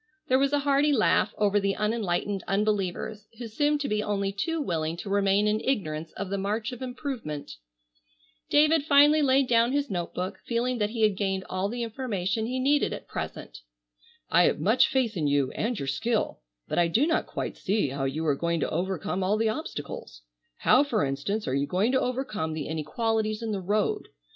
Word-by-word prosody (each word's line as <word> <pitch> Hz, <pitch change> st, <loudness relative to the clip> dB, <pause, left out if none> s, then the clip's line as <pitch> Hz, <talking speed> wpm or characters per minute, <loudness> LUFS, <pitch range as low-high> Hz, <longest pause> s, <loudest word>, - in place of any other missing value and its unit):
'" 390 Hz, -, -47 dB
There 260 Hz, +1 st, +4 dB
was 275 Hz, 0 st, +2 dB
a 290 Hz, -, +3 dB
hearty 285 Hz, +1 st, +3 dB
laugh 225 Hz, -6 st, +3 dB
over 205 Hz, -1 st, +3 dB
the 195 Hz, -1 st, 0 dB
unenlightened 205 Hz, -3 st, -1 dB
unbelievers 210 Hz, +1 st, -1 dB
who 240 Hz, -, -6 dB
seemed 290 Hz, +6 st, +1 dB
to 285 Hz, -, -1 dB
be 210 Hz, -3 st, 0 dB
only 200 Hz, -2 st, -1 dB
too 325 Hz, +12 st, -2 dB
willing 165 Hz, -, -2 dB
to 195 Hz, +2 st, -6 dB
remain 200 Hz, 0 st, +3 dB
in 210 Hz, +1 st, +2 dB
ignorance 160 Hz, -, -2 dB
of 200 Hz, -1 st, -5 dB
the 200 Hz, -, -1 dB
march 210 Hz, +4 st, -2 dB
of 250 Hz, -, -8 dB
improvement. 245 Hz, -, -5 dB, 0.9 s
David 300 Hz, +1 st, +4 dB
finally 295 Hz, +1 st, +6 dB
laid 270 Hz, -1 st, +3 dB
down 235 Hz, +1 st, +3 dB
his 285 Hz, -4 st, 0 dB
note 175 Hz, -2 st, -3 dB
book, 185 Hz, +2 st, -3 dB
feeling 240 Hz, +1 st, -1 dB
that 210 Hz, -1 st, +1 dB
he 225 Hz, 0 st, -2 dB
had 210 Hz, -2 st, +4 dB
gained 195 Hz, -1 st, -1 dB
all 185 Hz, +2 st, -1 dB
the 240 Hz, +2 st, -3 dB
information 220 Hz, -3 st, -2 dB
he 255 Hz, +2 st, -2 dB
needed 285 Hz, +2 st, +2 dB
at -, -, -8 dB
present. -, -, -6 dB, 0.7 s
"I -, -, +4 dB
have -, -, +1 dB
much 220 Hz, +6 st, +4 dB
faith 250 Hz, -5 st, 0 dB
in 155 Hz, -4 st, 0 dB
you 140 Hz, -2 st, +1 dB
and 235 Hz, +1 st, -2 dB
your 140 Hz, -, -4 dB
skill, 225 Hz, -, -1 dB, 0.3 s
but -, -, 0 dB
I 170 Hz, -, +4 dB
do 225 Hz, -, +2 dB
not 325 Hz, -, 0 dB
quite -, -, -4 dB
see 200 Hz, -6 st, 0 dB
how 135 Hz, +1 st, -3 dB
you 150 Hz, +4 st, -2 dB
are 150 Hz, -, +3 dB
going 170 Hz, +3 st, -1 dB
to -, -, -1 dB
overcome 180 Hz, +1 st, -2 dB
all 200 Hz, +3 st, +2 dB
the 220 Hz, 0 st, +2 dB
obstacles. 145 Hz, -, -6 dB, 0.3 s
How, 260 Hz, -, +5 dB
for 235 Hz, -, 0 dB
instance, 145 Hz, +11 st, -2 dB
are -, -, -1 dB
you 140 Hz, +1 st, 0 dB
going 195 Hz, -, +1 dB
to 260 Hz, -, +2 dB
overcome 225 Hz, -11 st, -2 dB
the 155 Hz, -2 st, -4 dB
inequalities 215 Hz, +8 st, -1 dB
in 225 Hz, -, -2 dB
the 200 Hz, -2 st, -2 dB
road? 205 Hz, +3 st, 0 dB
210 Hz, 200 wpm, -27 LUFS, 185-250 Hz, 0.9 s, finally